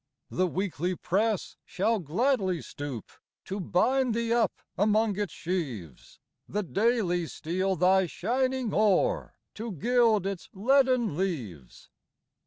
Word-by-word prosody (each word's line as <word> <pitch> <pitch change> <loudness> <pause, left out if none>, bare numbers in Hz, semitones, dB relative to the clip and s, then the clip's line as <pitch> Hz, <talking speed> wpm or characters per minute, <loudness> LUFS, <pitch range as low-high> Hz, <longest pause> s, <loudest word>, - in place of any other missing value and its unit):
The 185 0 +1
Weekly 180 -1 -2
press 200 +4 -1
shall 215 +4 0
gladly 190 - +1
stoop 140 -6 -7 0.3
To 195 +2 -4
bind 245 +7 +2
thee 230 0 0
up 235 -1 0
among 210 0 +2
its 205 -3 -1
sheaves; 140 - -5 0.3
The 210 +1 -1
Daily 195 -4 +1
steal 185 +6 -1
thy 185 +2 +4
shining 255 +3 -1
ore, 205 -3 +2 0.2
To 225 +1 -5
gild 225 - +2
its 195 -2 -4
leaden 255 - +3
leaves. 120 - -4
195 Hz, 115 wpm, -28 LUFS, 175-230 Hz, 0.3 s, thy